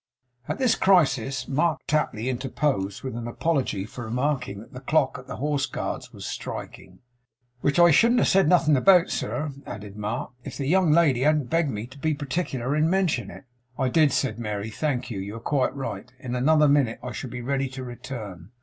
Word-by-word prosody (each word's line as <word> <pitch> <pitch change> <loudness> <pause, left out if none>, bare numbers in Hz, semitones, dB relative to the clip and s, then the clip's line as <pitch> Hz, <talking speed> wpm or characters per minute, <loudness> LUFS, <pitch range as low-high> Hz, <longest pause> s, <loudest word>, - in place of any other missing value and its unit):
At - - -2
this 255 -3 +3
crisis 135 - +2
Mark 155 +3 +1
Tapley 140 -6 0
interposed, 130 -5 -1
with 130 -3 -4
an 120 0 -5
apology 130 -6 -1
for 120 +2 -8
remarking 125 -2 -1
that 110 - -14
the 125 - -7
clock 135 -1 +1
at 130 - -13
the - - -6
Horse 145 0 -1
Guards - - -5
was - - -9
striking. - - -7 0.6
'Which 140 +4 +1
I 175 -1 +7
shouldn't 235 +10 +5
have - - +3
said 195 0 +4
nothing 160 -4 +4
about, 180 +5 +5
sir,' 150 0 -2 0.2
added 105 -1 -8
Mark, 105 +6 -4
'if - - -7
the 140 - -3
young 175 +2 +3
lady 150 -6 +4
hadn't 150 -2 +2
begged 165 -2 +2
me 105 -2 -4
to 130 +3 -14
be 155 +1 0
particular 140 -2 -2
in 155 +1 +2
mentioning 180 -9 +1
it.' - - -16 0.3
'I 130 -2 +1
did,' 155 +1 +4
said 130 -2 -1
Mary. 105 -1 -4
'Thank 130 -1 -2
you. 100 - -4
You 100 +3 -6
are - - -6
quite 135 +3 0
right. 135 -2 -5
In 130 -2 -6
another 150 +4 +4
minute 140 -5 +3
I 125 - -4
shall 120 +3 -6
be 125 0 -6
ready 135 +1 -1
to 130 0 -7
return. 110 -8 -8
135 Hz, 200 wpm, -25 LUFS, 120-155 Hz, 0.6 s, I